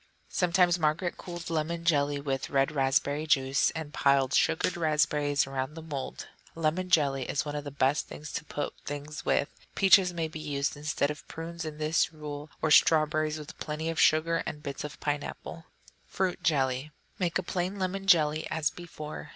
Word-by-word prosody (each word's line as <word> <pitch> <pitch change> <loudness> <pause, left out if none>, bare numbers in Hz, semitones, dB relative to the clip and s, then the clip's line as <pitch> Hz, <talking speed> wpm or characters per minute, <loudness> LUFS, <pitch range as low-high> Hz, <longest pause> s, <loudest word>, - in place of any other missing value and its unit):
Sometimes 180 0 +3
Margaret 165 +3 0
colored 175 -2 -7
lemon 165 +1 -2
jelly 145 -3 +2
with 135 -2 -3
red 135 -1 +2
raspberry 140 +2 +1
juice, 135 -2 +3
and 155 -2 -5
piled 140 -1 +3
sugared 175 0 +2
raspberries 150 -3 +2
around 135 +2 -4
the 165 - -7
mould. 145 -5 -5 0.3
Lemon 165 +3 0
jelly 140 -7 +2
is 145 - 0
one 145 0 -4
of 145 0 -4
the - - -4
best 140 +1 +1
things 150 0 -9
to - - -3
put 145 - -4
things 145 +1 -6
with; 140 - +2 0.3
peaches 190 -1 +6
may 165 -2 -2
be 155 0 -8
used 145 -2 -2
instead 145 0 -1
of 150 - -10
prunes, 165 0 -6
in 155 -1 -6
that 155 +1 +2
rule, 150 -1 -7
or 155 - +2
strawberries, 155 0 +4
with 150 +1 -10
plenty 155 +1 -3
of 165 - 0
sugar, 165 +2 +4
or - - -2
bits 150 -2 -6
of 150 - -7
pineapple. 150 +2 -4 0.4
Fruit 185 -1 -1
Jelly 135 -2 +1 0.3
Make 175 -3 +1
a 185 - -2
plain 180 +3 -2
lemon 195 +1 -3
jelly, 155 -4 +4
as 160 -1 0
before. 155 -3 -8
155 Hz, 175 wpm, -29 LUFS, 145-165 Hz, 0.4 s, peaches